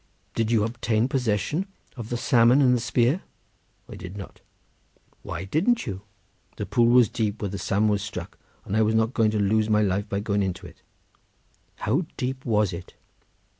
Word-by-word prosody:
"Did 115 -1 0
you 115 -3 +3
obtain 115 0 0
possession 130 - -1 0.3
of 115 -4 -7
the 120 - -1
salmon 120 +1 +4
and 130 -3 +5
the - - 0
spear?" 125 +7 +1 0.7
"I - - -10
did 90 +3 -8
not." 100 - -10 0.8
"Why 85 +3 -5
didn't 195 - +1
you?" 95 -6 -5 0.6
"The - - -3
pool 120 -1 +3
was 120 -1 +6
deep 110 -1 -2
where 100 - -2
the 100 +1 -5
salmon 100 +2 +1
was 105 -1 +1
struck, 90 -4 -7 0.3
and 100 - -3
I 110 - +3
was 110 +1 +2
not 110 +2 +2
going 110 -4 +3
to 105 0 -1
lose 110 +2 +2
my 105 0 +3
life 100 +1 -1
by 100 - -1
going 100 -1 0
into 95 -1 -3
it." 85 - -13 0.9
"How 145 - -1
deep 130 +1 -3
was 105 -5 +2
it?" 85 +1 -9
110 Hz, 185 wpm, -25 LUFS, 100-120 Hz, 0.9 s, was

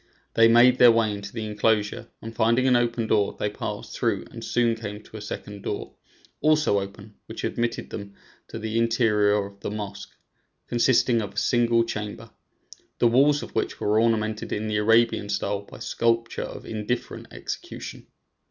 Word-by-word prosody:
They 115 0 +6
made 120 +2 +6
their 125 -1 +9
way 115 -2 +2
into 100 -1 -7
the 110 -2 -4
enclosure, 105 +2 0 0.2
and 115 +1 -7
finding 115 +3 +3
an 130 -1 +4
open 120 -1 +1
door, 105 -2 +1
they 105 - -1
passed - - -6
through - - 0
and - - -9
soon 120 -1 +2
came 105 -2 -7
to 110 - -11
a - - -8
second 105 0 -7
door, - - -5 0.5
also 155 -8 +3
open, 100 +2 -9
which - - -7
admitted 120 0 -2
them 100 -1 -7 0.3
to - - -7
the 110 0 -2
interior 115 -3 +3
of 100 0 -12
the - - -4
mosque, 100 -1 -6 0.6
consisting 120 -1 +3
of 105 - -6
a - - -15
single 120 -2 +3
chamber, 110 0 -6 0.7
the 120 - +4
walls 140 +5 +4
of - - -10
which - - -2
were 105 +2 +2
ornamented 110 -2 0
in 110 +1 -2
the 105 -1 0
Arabian 110 -1 +3
style 100 0 -1
by 100 - -13
sculptures 115 0 -1
of - - -9
indifferent 110 +2 -4
execution. - - -7
110 Hz, 170 wpm, -25 LUFS, 105-115 Hz, 0.7 s, their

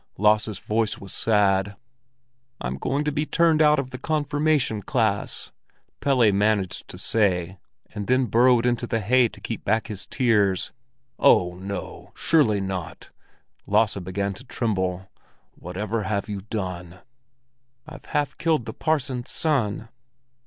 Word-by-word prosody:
Lasse's 105 0 +2
voice 110 +1 -1
was 100 - -10
sad. 100 -2 +2 0.8
"I'm - - -4
to 145 +3 -1
be 150 +1 -2
turned 165 -2 +3
out 150 0 +5
of 135 -2 -3
the 130 - -7
confirmation 145 -5 0
class," 110 -3 -1 0.5
Pelle 125 -6 +3
managed 100 -1 0
to - - -8
say, 95 -4 0 0.3
and 105 -2 -5
then 130 +1 +3
burrowed 120 +2 +4
into 120 0 0
the 115 - 0
hay 120 +4 +4
to - - -14
keep - - -5
back 110 +2 +1
his 100 -2 -7
tears. 105 -7 +1 0.5
"Oh, 90 0 +5
no, 95 +1 -7
surely 120 -11 +3
not!" 95 -3 -5 0.6
Lasse 105 0 +2
began 100 +2 -3
to 115 - -10
tremble. 95 -7 -2 0.5
"Whatever 105 +6 -4
have 100 0 -2
you 100 -2 -4
done?" 90 -4 -5 0.8
"I've 155 -1 -12
half 145 -1 -1
killed 160 -8 +1
the - - -6
parson's 135 -6 -1
son." 115 -8 -1
110 Hz, 135 wpm, -24 LUFS, 100-130 Hz, 0.8 s, out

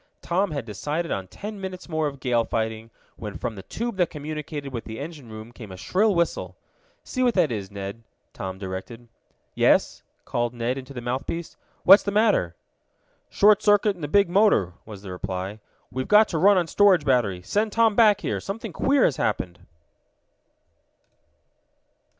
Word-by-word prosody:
Tom 185 +3 +1
had 140 -6 -4
decided 150 - -3
on 95 -1 -3
ten 205 - -8
minutes 185 -1 -6
more 155 -3 0
of 140 -2 -7
gale 120 -3 +1
fighting, 110 0 -3 0.3
when 105 -3 -6
from 120 -2 -3
the 100 - -9
tube 230 - -5
that 180 -3 +2
communicated 150 -2 -6
with 115 - -5
the 110 0 -7
engine 145 -4 -8
room 110 +2 -9
came 110 -4 -11
a 95 - -9
shrill 200 - +1
whistle. 170 0 -1 0.5
"See 255 - -4
what 245 -3 +2
that 175 -7 +3
is, 100 -4 -4
Ned," 100 +2 -7 0.3
Tom 95 -1 -6
directed. 95 +5 -7 0.4
"Yes," - - +2 0.2
called 120 0 -2
Ned 120 +2 -1
into 130 +1 -11
the 120 - -5
mouthpiece. 130 +7 -4 0.3
"What's 195 +3 +9
the - - -3
matter?" 200 - +2 0.7
"Short 210 0 +5
circuit 205 -1 +3
in 175 - -14
the 145 - -3
big 200 +5 +4
motor," 175 - +3
was 105 -3 -10
the 95 - -7
reply. 95 +3 -5 0.3
"We've 130 0 -3
got 210 0 +6
to 165 - -1
run 200 +3 +6
on 175 - +2
storage 185 -3 +4
battery. 105 -9 +1
Send 210 - 0
Tom 225 -1 +3
back 210 -3 +5
here! - - -2
Something 200 +3 -6
queer 275 -1 +3
has 135 - +1
happened!" 90 -5 -2
145 Hz, 175 wpm, -24 LUFS, -, 0.7 s, What's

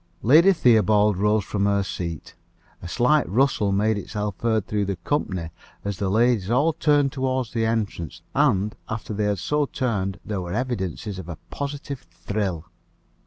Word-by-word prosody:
Lady 160 - +7
Theobald 110 - +4
rose 105 +2 +2
from 100 -1 -1
her 100 -1 +2
seat. 85 -4 -5 0.5
A - - -7
slight 130 +10 +2
rustle 115 -2 +2
made 105 +2 +2
itself 105 0 -4
heard 110 -3 +1
through 105 -1 -1
the 100 0 -2
company, 90 - -2 0.3
as 100 -2 -2
the 100 -2 -1
ladies 110 -1 +2
all 140 +7 +3
turned 145 -3 +2
toward 130 -3 -1
the 115 -1 +1
entrance; 105 - -3
and, 105 -8 +2
after 115 -1 -4
they 105 0 -1
had 105 -1 +1
so 150 - 0
turned, 100 -8 -2
there 105 -3 -3
were 85 -1 -5
evidences 105 -4 -3
of 90 -2 -8
a 85 - -6
positive 140 -1 -5
thrill. 90 -1 -4
105 Hz, 165 wpm, -24 LUFS, 95-125 Hz, 0.5 s, Lady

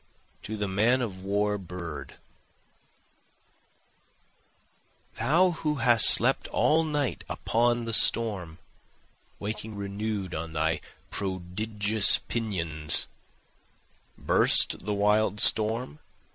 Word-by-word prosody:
To 110 - -7
the 105 -1 -3
Man 110 +7 +1
of 95 -5 -7
War 105 +1 -1
Bird 85 -5 -9 3.0
Thou 180 +5 +1
who 155 -2 -3
hast 120 -3 +6
slept 130 +4 +3
all 160 +2 +1
night 150 -5 -3
upon 120 0 -1
the 115 - -5
storm, 100 -8 +3 0.8
Waking 110 +1 -6
renew'd 100 -1 -5
on 80 0 -6
thy 80 +1 -1 0.3
prodigious 100 +3 0
pinions, 85 -10 -1 1.1
(Burst 95 - +2
the 105 - -1
wild 105 +1 +1
storm? 110 -6 +2
105 Hz, 90 wpm, -26 LUFS, 95-115 Hz, 3.0 s, hast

